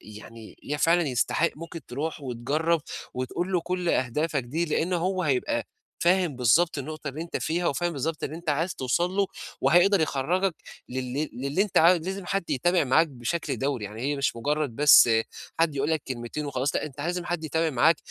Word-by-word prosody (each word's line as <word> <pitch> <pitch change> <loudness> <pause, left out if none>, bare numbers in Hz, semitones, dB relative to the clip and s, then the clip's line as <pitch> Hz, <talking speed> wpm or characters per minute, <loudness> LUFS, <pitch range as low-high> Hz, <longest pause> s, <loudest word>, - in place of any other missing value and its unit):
يعني 110 +1 -12 0.2
فعلًا 170 +3 +4
يستحق، 130 +6 +1
ممكن 165 +1 -8
تروح 150 +5 -4
وتجرّب 145 +6 0 0.3
وتقول 130 +9 -3
له 180 - +2
كل 180 0 -2
أهدافك 145 +2 0
دي، 155 +8 -1
لإن 170 +2 -1
هو 185 +2 0
هيبقى 135 -5 0 0.4
فاهم 175 -4 +2
بالضبط 145 +7 +3
النُقطة 155 +1 -5
اللي 150 +4 -5
أنت 170 - -4
فيها، 170 +2 -1
وفاهم 175 +4 0
بالضبط 155 +2 -3
اللي 155 - -5
أنت 170 -1 -10
عايز 165 +5 0
توصل 155 +8 0
له، 195 +1 +1 0.3
وهيقدر 175 +7 +4
يخرّجك 165 +5 0 0.3
لل 130 +4 -3
للي 140 +9 0
أنت 210 - +1
عايز 170 +1 +5
لازم 190 -1 -4
حد 195 -1 -2
يتابع 175 +5 +2
معاك 160 +6 +4
بشكل 135 +2 -3
دَوري. 135 -6 -1
يعني 105 +3 -7
هي 145 +2 0
مش 135 -3 0
مُجرّد 145 0 -1
بس 145 -4 +8 0.5
حد 160 -3 +2
يقول 140 +3 0
لك 160 -3 0
كلمتين 130 +4 -4
وخلاص، 135 +1 -1
لأ - - -1
أنت 145 -1 -10
لازم 175 +3 -2
حد 175 -2 -3
يتابع 160 +1 0
معاك 160 +6 +5
155 Hz, 180 wpm, -26 LUFS, 135-170 Hz, 0.5 s, بس